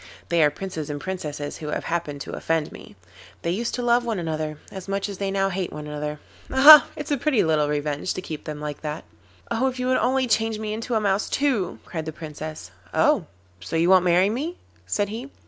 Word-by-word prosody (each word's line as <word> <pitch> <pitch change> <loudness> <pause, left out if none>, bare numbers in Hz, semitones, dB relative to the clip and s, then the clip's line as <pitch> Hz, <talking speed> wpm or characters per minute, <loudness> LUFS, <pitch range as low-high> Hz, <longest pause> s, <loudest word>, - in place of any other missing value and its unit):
They 170 -1 +3
are 150 - +6
princes 160 -1 -6
and 145 0 -3
princesses 150 -5 -5
who 155 - -7
have 150 - -2
happened 165 -4 -3
to - - -6
offend 160 -2 -1
me. - - -12 0.5
They 170 - 0
used 230 +6 -1
to 245 - -3
love 240 0 +3
one 230 -3 -2
another 155 -3 -3
as 190 -1 -8
much 195 +1 -1
as 200 -2 -7
they 195 -1 -1
now 195 0 +1
hate 190 -1 -3
one 150 0 -7
another. 150 0 -4 0.3
Aha! 285 +3 +10
It's 300 0 -6
a 290 - +2
pretty 265 -3 +2
little 155 -2 +2
revenge 150 +3 -1
to - - -3
keep 155 -4 -7
them 150 -1 -5
like 150 -1 -5
that.' 150 0 -5 0.5
'Oh! 235 +3 +2
If 255 -1 -3
you 250 - -1
would 255 - +3
only 260 +3 +2
change 225 -1 +1
me 215 0 -3
into 230 +2 -3
a - - +4
mouse 200 -1 0
too,' 255 -11 0
cried 160 -3 -5
the - - -2
Princess. 155 - -8 0.2
'Oh! - - +3 0.3
so - - -6
you 170 +3 +3
won't 185 -1 +7
marry 180 +3 +4
me?' 305 +10 -3 0.3
said 205 -1 0
he. 235 +6 -6
185 Hz, 225 wpm, -24 LUFS, 155-225 Hz, 0.5 s, Aha